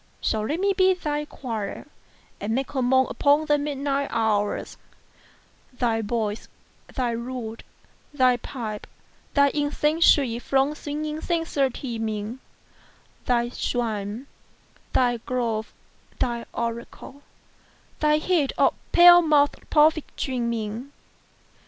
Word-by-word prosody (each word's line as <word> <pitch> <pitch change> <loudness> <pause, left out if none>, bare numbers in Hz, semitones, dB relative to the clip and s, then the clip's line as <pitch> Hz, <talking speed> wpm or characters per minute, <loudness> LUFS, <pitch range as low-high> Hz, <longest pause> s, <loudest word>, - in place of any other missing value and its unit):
So 215 - 0
let 290 +10 -2
me 395 +1 +2
be 375 -1 +4
thy 300 -4 -3
choir, 225 -8 -5 0.5
and 220 +2 -2
make 270 +2 -2
a 265 - 0
moan 260 +1 +4
Upon 290 +2 +2
the 295 -1 +2
midnight 280 -1 -1
hours; 215 -3 0 1.0
45 - - -29
Thy 230 -2 +1
voice, 215 -1 -2 0.4
thy 245 -2 -1
lute, 235 -1 -5 0.5
thy 255 -4 +3
pipe, 225 -4 -6 0.5
thy 280 -1 +5
incense 300 +3 +1
sweet 245 -5 +4
From 270 +3 +1
swingèd 300 +1 -5
censer 325 -6 0
teeming: 225 -2 -4 0.9
Thy 240 -1 +2
shrine, 225 -1 -3 0.7
thy 245 -2 +2
grove, 230 -2 -2 0.5
thy 235 -1 -2
oracle, 235 +4 -6 0.8
thy 300 0 +3
heat 310 -3 +1
Of - - +4 0.2
pale 350 0 +9
mouth'd 295 -3 +2
prophet 310 0 +4
dreaming. 235 0 -3
255 Hz, 115 wpm, -24 LUFS, 230-295 Hz, 1.0 s, pale